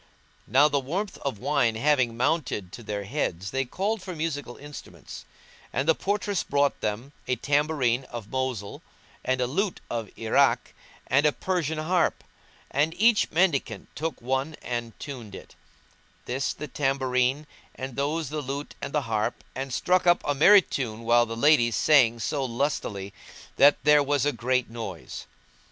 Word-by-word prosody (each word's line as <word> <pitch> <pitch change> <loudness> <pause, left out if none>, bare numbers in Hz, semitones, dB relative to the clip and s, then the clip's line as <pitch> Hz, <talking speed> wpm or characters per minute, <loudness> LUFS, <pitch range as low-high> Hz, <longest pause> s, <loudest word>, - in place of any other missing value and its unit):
Now 135 +6 +5
the 145 -1 +1
warmth 180 +10 -4
of 140 -6 -3
wine 120 0 +1
having 125 -2 +2
mounted 125 - -1
to 120 - -9
their 105 -2 -4
heads 100 - -3
they 135 0 0
called 200 - -2
for 185 -1 -7
musical 145 -6 -4
instruments; 145 -1 -10 0.5
and 135 - -1
the 160 - +6
portress 205 +2 -1
brought 140 0 0
them 110 +6 -3 0.2
a 130 - +1
tambourine 140 -3 +1
of 115 -5 -8
Mosul, 130 -6 -3 0.4
and 130 0 0
a 125 - +2
lute 190 - -1
of 115 -2 -2
Irák, 110 -1 +3 0.5
and 145 +4 +3
a - - +4
Persian 165 -2 -2
harp; 170 +2 +1 0.5
and 150 +4 +1
each 225 +1 +4
mendicant 145 - 0
took 160 +1 -3
one 135 +5 -2
and 120 -2 -4
tuned 120 -8 -8
it; - - -12 0.7
this 130 +2 -1
the 150 - -7
tambourine 135 0 0 0.3
and 130 -1 -6
those 150 +2 -1
the 150 0 -3
lute 140 +2 -5
and - - -5
the 150 - +2
harp, 110 0 -2
and 135 +1 -5
struck 180 +7 +1
up 175 0 +4
a 145 - +1
merry 190 +8 +7
tune 115 -7 -4
while 120 +1 +4
the 115 +1 -5
ladies 120 -4 +4
sang 120 -6 +4
so 140 +5 -1
lustily 115 -6 -2 0.4
that 145 +1 +7
there 150 0 +6
was 140 -1 +1
a 145 - +3
great 125 +1 0
noise. 110 -7 -7
135 Hz, 160 wpm, -26 LUFS, 120-150 Hz, 0.7 s, merry